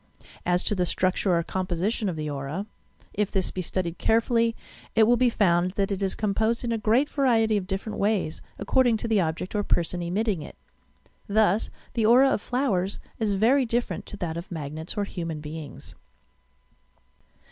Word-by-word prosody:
As 180 0 +2
to - - +1
the 180 -3 0
structure 185 0 +1
or 170 - 0
composition 190 +4 -1
of 175 - -3
the 155 -1 -4
aurai 145 +6 -4 0.5
If 210 -1 0
this 190 -3 0
be 185 - -3
studied 175 -1 -2
carefully, 230 0 +2 0.4
it 225 - +6
will 240 +3 +5
be 250 +1 +3
found 180 -4 +2
that 200 0 0
it 200 0 -2
is 195 -1 0
composed 220 +3 0
in 240 - -1
a 230 - +1
great 230 +7 +3
variety 230 -7 +2
of 195 -3 -1
different 195 +3 -4
ways, 200 -6 0 0.2
according 240 +3 +3
to 230 - -4
the 220 -3 +3
object 165 +2 -3
or 210 - +1
person 175 -2 0
emitting 190 +1 -1
it. 150 - -9 0.7
Thus, 210 -1 +2 0.2
the 225 -2 +2
aura 260 +4 +6
of 210 - 0
flowers 205 -8 0 0.2
is 210 -3 +1
very 245 +7 +4
different 240 0 -2
to 205 - -8
that 165 -3 -3
of 170 - -7
magnets 160 +1 -5
or 205 - +1
human 165 -5 -4
beings. 150 0 -8
200 Hz, 180 wpm, -26 LUFS, 175-225 Hz, 0.7 s, it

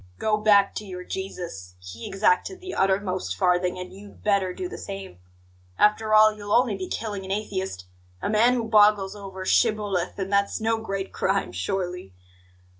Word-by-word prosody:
Go 215 - +1
back 205 -2 +4
to - - -4
your 180 -3 -7
Jesus; 170 - -6
he 90 +6 -9
exacted 195 - +1
the 370 0 -7
uttermost 190 - 0
farthing, 180 - +1
and 180 0 -7
you'd 200 +1 -14
better 200 -3 +2
do 365 - -5
the - - -8
same. 195 - -8 0.6
After 215 +1 +3
all, 215 0 +7
you'll 205 -1 -8
only 245 -4 +3
be 190 -1 -5
killing 205 -3 -4
an 190 - -9
atheist 190 - -3 0.3
a - - -3
man 225 +4 +4
who 240 - -1
boggles 210 -3 +4
over 190 -2 -8
'shibboleth'; 205 -5 +1
and 195 0 -3
that's 200 0 +2
no 225 0 0
great 195 -3 -4
crime, 195 +1 0
surely!" 180 - -4
195 Hz, 170 wpm, -25 LUFS, 185-215 Hz, 0.6 s, all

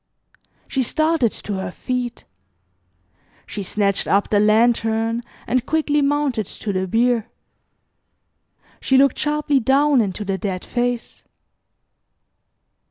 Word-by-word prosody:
She 265 - -1
started 310 -2 +1
to 200 -2 -5
her 190 -1 -4
feet. 245 +4 -4 1.2
She 205 - -6
snatched 200 +1 0
up 200 +1 +1
the 205 - +4
lantern 225 +1 +2 0.2
and 255 -1 0
quickly 295 0 +1
mounted 280 -7 0
to 205 - -5
the 190 0 -1
bier. 230 +2 +1 1.5
She 265 - +2
looked 275 +1 +3
sharply 295 -2 +1
down 270 +2 +3
into 205 0 -3
the 195 -1 -2
dead 190 -4 -4
face. 245 -1 -3
235 Hz, 110 wpm, -21 LUFS, 210-275 Hz, 1.5 s, the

